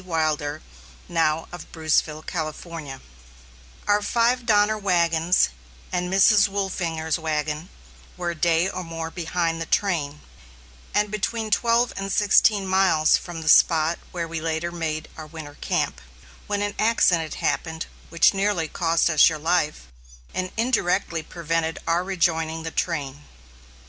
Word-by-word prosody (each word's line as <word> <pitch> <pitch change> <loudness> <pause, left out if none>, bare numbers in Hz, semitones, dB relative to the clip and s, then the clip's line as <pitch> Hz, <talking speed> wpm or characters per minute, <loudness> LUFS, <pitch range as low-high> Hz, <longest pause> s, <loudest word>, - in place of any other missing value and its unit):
Wilder, 155 -3 -1 0.4
now 165 -1 0
of 175 - -10
Bruceville, 155 -1 0
California: 155 -4 -6 0.9
Our 205 0 +3
five 235 +3 +1
Donner 210 0 +4
wagons, 175 -4 +2 0.4
and 180 0 -2
Mrs. 195 +1 +5
Wolfinger's 175 -5 -2
wagon, 155 +1 -3 0.5
were 175 -1 -2
a - - -7
day 165 +2 +2
or 185 -1 -4
more 165 -1 -6
behind 165 -1 -2
the 165 - -4
train, 150 -7 0 0.7
and 210 0 +1
between 215 +1 -2
twelve 230 +3 +2
and 195 0 -4
sixteen 205 0 +4
miles 190 -5 +3
from 175 -2 -5
the - - -8
spot 160 +1 +4
where 170 -2 -3
we 165 -1 -5
later 165 +1 -2
made 155 -2 -3
our 155 -1 -8
winter 155 -2 -9
camp, 65 - -1 0.5
when 205 0 -1
an 205 0 -2
accident 180 -8 +2
happened 160 -1 -2 0.2
which 170 +3 +4
nearly 195 -4 0
cost 165 0 +1
us 160 -1 +6
your 160 - -4
life, 155 -1 0 0.5
and 185 0 -3
indirectly 195 -8 0
prevented 165 0 -2
our 170 +2 +1
rejoining 165 -4 0
the 160 - -5
train. 145 -5 -3
170 Hz, 135 wpm, -24 LUFS, 160-195 Hz, 0.9 s, us